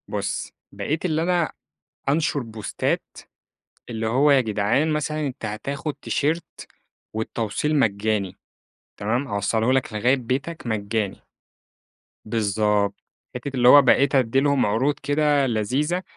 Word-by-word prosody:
بُصّ، - - -3 0.2
بقيت 155 +4 -3
اللي 160 -2 +1
أنا 175 -1 +1 0.6
أنشر 150 0 +1
بوستات 110 -4 -3 0.7
اللي 110 -1 -2
هو 135 +6 +4
يا 135 -2 +6
جدعان، 110 +7 +1
مثلًا 150 0 -1
أنت 125 -4 -6
هتاخد 135 +8 -4
تيشيرت 160 +4 -2 0.5
والتوصيل 110 +6 -2
مجاني، 100 -4 0 0.6
تمام، 120 +7 -1
هاوصله 110 +3 +1
لك 130 -3 0
لغاية 120 +5 +2
بيتك 130 +5 -4
مجاني. 105 -2 -2 1.0
بالضبط 105 -2 +1 0.4
حتّة 125 +3 -4
اللي 125 -1 +5
هو 145 +2 +9
بقيت 140 +2 +4
ادّي 130 -1 +3
لهم 140 -2 +2
عروض 130 +8 +1
كده 145 -1 +2
لذيذة، 130 - 0
125 Hz, 120 wpm, -23 LUFS, 110-145 Hz, 1.0 s, هو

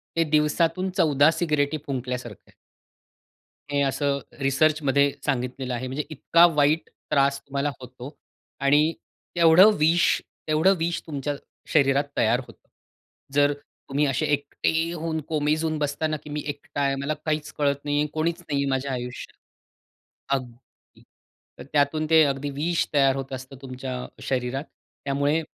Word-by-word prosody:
ते 165 - +3
दिवसातून 160 +5 +2
14 150 -4 +5
सिगारेटी 150 -3 0
फुंकल्यासारखं 125 -5 -5
आहे. - - -23 1.2
हे 145 - +1
असं 140 0 0 0.2
रिसर्चमध्ये 140 0 +2
सांगितलेलं 130 -1 -2
आहे. 125 +2 -3
म्हणजे 135 +4 -3
इतका 165 +3 +4
वाईट 150 +2 +2 0.2
त्रास 140 0 +3
तुम्हाला 140 +1 -2
होतो 125 +3 -10 0.4
आणि 145 +3 +4 0.4
तेवढं 170 +5 +7
विष, 165 +3 +3 0.3
तेवढं 155 +5 +4
विष 170 +1 -1
तुमच्या 145 -1 -3 0.4
शरीरात 140 -2 +4
तयार 115 +2 +3
होतं. - - -18 0.7
जर 145 0 +4 0.4
तुम्ही 145 +2 +1
असे 140 +2 0
एकटे 160 +3 0
होऊन 165 -1 -3
कोमेजून 155 +1 0
बसता 145 +2 -1
ना 155 0 -2
की - - -11
मी 150 0 -3
एकटा 145 0 -5
आहे 140 -1 +1
मला 140 +2 -1
काहीच 155 -1 -1
कळत 140 -1 +2
नाहीये, 145 0 +1
कोणीच 165 +2 -1
नाहीये 140 -4 -1
माझ्या 135 +1 -1
आयुष्यात. 125 -1 -6 1.0
अगदी 125 -2 -11 0.6
तर - - -7
त्यातून 150 +2 +2
ते 160 -1 +7
अगदी 140 0 -2
विष 160 +5 0
तयार 135 -2 +4
होत 135 -1 -5
असतं 130 +1 -8
तुमच्या 130 -1 -6 0.3
शरीरात. 130 +1 -2 0.4
त्यामुळे 145 +3 +1
145 Hz, 135 wpm, -25 LUFS, 135-155 Hz, 1.2 s, तेवढं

